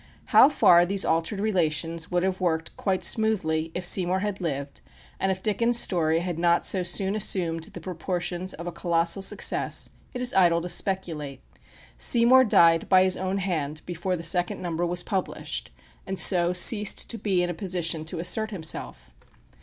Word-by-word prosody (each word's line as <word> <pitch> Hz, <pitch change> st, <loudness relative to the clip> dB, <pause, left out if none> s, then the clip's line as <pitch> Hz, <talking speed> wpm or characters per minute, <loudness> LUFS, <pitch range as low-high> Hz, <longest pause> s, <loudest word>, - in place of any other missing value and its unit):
How 270 Hz, -, +7 dB
far 175 Hz, -, +5 dB
these 195 Hz, +2 st, -1 dB
altered 165 Hz, +5 st, -1 dB
relations 165 Hz, -5 st, -2 dB
would 175 Hz, 0 st, -1 dB
have 190 Hz, 0 st, -2 dB
worked 160 Hz, -2 st, -2 dB
quite 190 Hz, -2 st, -2 dB
smoothly 165 Hz, -8 st, 0 dB
if 180 Hz, -, -4 dB
Seymour 185 Hz, +1 st, +2 dB
had 205 Hz, -1 st, -4 dB
lived, 140 Hz, -4 st, -5 dB, 0.4 s
and 195 Hz, -, 0 dB
if 190 Hz, 0 st, -5 dB
Dickens' 230 Hz, +3 st, +1 dB
story 165 Hz, -6 st, +1 dB
had 175 Hz, -2 st, -4 dB
not 170 Hz, 0 st, +2 dB
so 190 Hz, -, +2 dB
soon 190 Hz, +3 st, -2 dB
assumed 170 Hz, -6 st, -1 dB
the -, -, -11 dB
proportions 180 Hz, +1 st, -5 dB
of 170 Hz, -, -9 dB
a 175 Hz, -, -4 dB
colossal 170 Hz, +2 st, 0 dB
success, -, -, +1 dB, 0.2 s
it -, -, -4 dB
is 250 Hz, 0 st, 0 dB
idle 175 Hz, -3 st, +3 dB
to 175 Hz, -, -6 dB
speculate. 165 Hz, -7 st, -2 dB, 0.6 s
Seymour 250 Hz, +2 st, +4 dB
died 165 Hz, -6 st, +3 dB
by 185 Hz, -1 st, +5 dB
his 185 Hz, -1 st, +1 dB
own 190 Hz, +1 st, -3 dB
hand 155 Hz, -6 st, -3 dB
before 180 Hz, +1 st, -3 dB
the 165 Hz, -, -8 dB
second 175 Hz, +2 st, 0 dB
number 175 Hz, 0 st, -3 dB
was 175 Hz, 0 st, -2 dB
published, 190 Hz, -4 st, -4 dB, 0.4 s
and 190 Hz, 0 st, -3 dB
so 175 Hz, -2 st, +4 dB
ceased 205 Hz, +3 st, +3 dB
to 230 Hz, -, -7 dB
be 190 Hz, -4 st, 0 dB
in 175 Hz, -, -2 dB
a -, -, -5 dB
position 170 Hz, -3 st, -2 dB
to 170 Hz, +2 st, -3 dB
assert 220 Hz, +6 st, +1 dB
himself. 160 Hz, -, -4 dB
180 Hz, 175 wpm, -25 LUFS, 165-195 Hz, 0.6 s, How